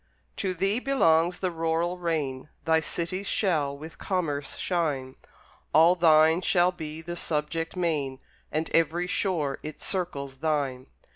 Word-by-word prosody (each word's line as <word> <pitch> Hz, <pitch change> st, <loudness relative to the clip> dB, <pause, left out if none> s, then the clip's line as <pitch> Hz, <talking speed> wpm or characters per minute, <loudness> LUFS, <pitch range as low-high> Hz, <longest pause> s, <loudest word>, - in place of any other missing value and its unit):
To 185 Hz, -1 st, -1 dB
thee 195 Hz, +6 st, +1 dB
belongs 175 Hz, -11 st, +3 dB
the 185 Hz, -2 st, 0 dB
rural 165 Hz, +2 st, -1 dB
reign; 150 Hz, -5 st, -2 dB, 0.2 s
Thy 160 Hz, 0 st, +4 dB
cities 175 Hz, +5 st, -3 dB
shall 150 Hz, -8 st, +1 dB
with 155 Hz, +2 st, -10 dB
commerce 150 Hz, -7 st, -2 dB
shine; 145 Hz, -7 st, -1 dB, 0.6 s
All 165 Hz, +3 st, +7 dB
thine 160 Hz, -1 st, +5 dB
shall 180 Hz, 0 st, +3 dB
be 160 Hz, -2 st, -7 dB
the 175 Hz, +1 st, -5 dB
subject 165 Hz, +1 st, -2 dB
main, 150 Hz, -7 st, -1 dB, 0.3 s
And 155 Hz, +1 st, -1 dB
every 165 Hz, +2 st, +2 dB
shore 170 Hz, -7 st, -1 dB
it 155 Hz, 0 st, -7 dB
circles 140 Hz, -8 st, -3 dB
thine. 140 Hz, -4 st, -1 dB
165 Hz, 135 wpm, -27 LUFS, 150-180 Hz, 0.6 s, All